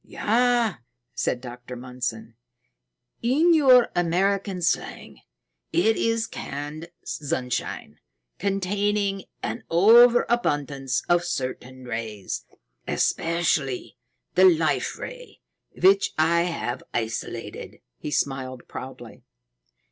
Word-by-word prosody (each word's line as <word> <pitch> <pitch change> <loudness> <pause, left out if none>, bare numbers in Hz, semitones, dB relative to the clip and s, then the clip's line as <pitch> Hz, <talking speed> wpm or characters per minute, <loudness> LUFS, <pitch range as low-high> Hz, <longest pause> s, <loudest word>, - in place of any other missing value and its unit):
"Yes," 240 -2 +1 0.4
said 125 - -1
Dr. 125 0 -9
Mundson. 125 -2 -5 0.9
"In 300 +9 +4
your 260 -6 +6
American 185 +2 0
slang, - - -2 0.5
it 220 +6 +3
is 230 0 +1
canned 150 +2 -6 0.2
sunshine 125 - -3 0.4
containing 200 0 0 0.2
an - - -3
overabundance 175 - +4
of 175 0 +3
certain 130 -4 -4
rays, 115 -4 -5 0.4
especially 165 -7 0 0.4
the 185 +2 +6
Life 165 -4 +2
Ray, - - -9 0.4
which 195 +2 +4
I 170 +2 +3
have 165 -8 -3
isolated." 115 0 -4 0.2
He - - -5
smiled 130 -3 -2
proudly. 130 -3 -9
170 Hz, 85 wpm, -25 LUFS, 130-205 Hz, 0.9 s, your